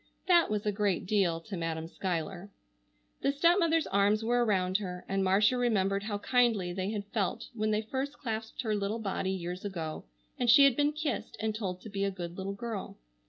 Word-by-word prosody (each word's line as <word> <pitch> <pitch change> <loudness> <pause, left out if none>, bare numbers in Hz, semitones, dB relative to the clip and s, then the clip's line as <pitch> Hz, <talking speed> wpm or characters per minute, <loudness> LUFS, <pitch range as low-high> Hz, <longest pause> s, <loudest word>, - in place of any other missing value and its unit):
That 345 -2 +5
was 210 0 -1
a 210 - +2
great 200 -3 0
deal 185 -4 +2
to 195 +3 -7
Madam 165 -1 -3
Schuyler. 180 +2 -4 0.7
The 275 - +2
stepmother's 330 +2 +3
arms 200 +2 +2
were 240 +2 +2
around 190 -4 +2
her 180 -3 -6
and 195 0 0
Marcia 205 +6 +4
remembered 200 -5 +1
how 205 0 -3
kindly 220 -5 +2
they 190 +1 -2
had 205 -2 -3
felt 200 -6 -1
when 215 -2 -1
they 215 0 +1
first 265 +5 -3
clasped 225 -2 -4
her 220 -2 0
little 205 +1 -1
body 195 -3 -2
years 180 -1 -4
ago, 165 - -5 0.3
and 245 - +1
she 280 +5 +9
had 275 -3 +6
been 290 +2 +2
kissed, 300 -6 -3
and 220 0 -1
told 190 -4 -4
to 220 - -9
be 200 0 -2
a 200 - +2
good 175 -3 -6
little 195 +1 -4
girl. 220 -1 -5
205 Hz, 200 wpm, -30 LUFS, 190-235 Hz, 0.7 s, she